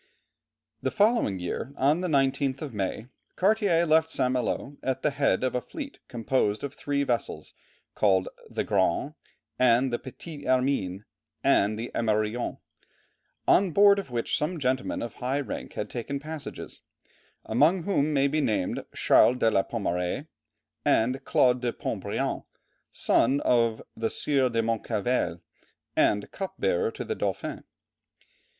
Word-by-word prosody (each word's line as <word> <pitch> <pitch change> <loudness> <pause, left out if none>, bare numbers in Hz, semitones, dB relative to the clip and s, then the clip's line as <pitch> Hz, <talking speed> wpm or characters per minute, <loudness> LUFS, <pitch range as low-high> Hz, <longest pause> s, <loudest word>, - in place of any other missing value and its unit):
The - - 0
following 210 - +2
year, 105 +9 -4
on 145 +6 +3
the 185 - -1
19th 135 -2 +1
of 140 -5 -6
May, 105 +2 -3 0.3
Cartier 195 -4 +3
left 160 0 +3
St. 125 -5 +1
Malo 130 +3 -2
at 130 -1 -2
the 150 - +2
head 140 -2 +1
of 130 - 0
a 125 - 0
fleet 285 - -8
composed 115 -3 0
of 140 -1 -4
three 140 0 -1
vessels 120 -5 -2 0.4
called 95 -3 +2 0.2
the - - -2
Grande - - +1 0.5
and 125 +1 +4
the 120 - 0
Petite 145 +3 -9
Hermine 125 -7 0 0.4
and 105 +2 +3
the 115 +2 -5
Emerillon 110 +1 0 0.9
on 195 -1 +5
board 200 +3 +6
of 195 - -6
which 120 -2 -1
some 165 +4 -1
gentlemen 130 -2 -1
of 120 - -5
high 130 +3 -2
rank 140 - -5
had - - -3
taken 140 +4 -4
passages, 155 +1 -8 0.6
among 155 +10 +3
whom 155 -6 +1
may 140 -1 +3
be 155 +2 0
named 100 -8 -1
Charles 125 - +5
de 115 -2 +3
la 95 - +3
Pommeraye, 95 - -2 0.6
and 125 +4 +2
Claude 125 -1 +3
de 120 -1 0
Pont - - -4
Briant, - - -2 0.5
son 135 +4 +2
of 115 -2 +2
the 115 0 -1
Sieur 135 -3 +1
de 115 -1 0
Moncevelles 110 -5 -1 0.5
and 105 -1 +2
cup 195 -1 -5
bearer 480 -2 +1
to - - -6
the - - -2
Dauphin. - - -3
130 Hz, 145 wpm, -27 LUFS, 115-150 Hz, 0.9 s, board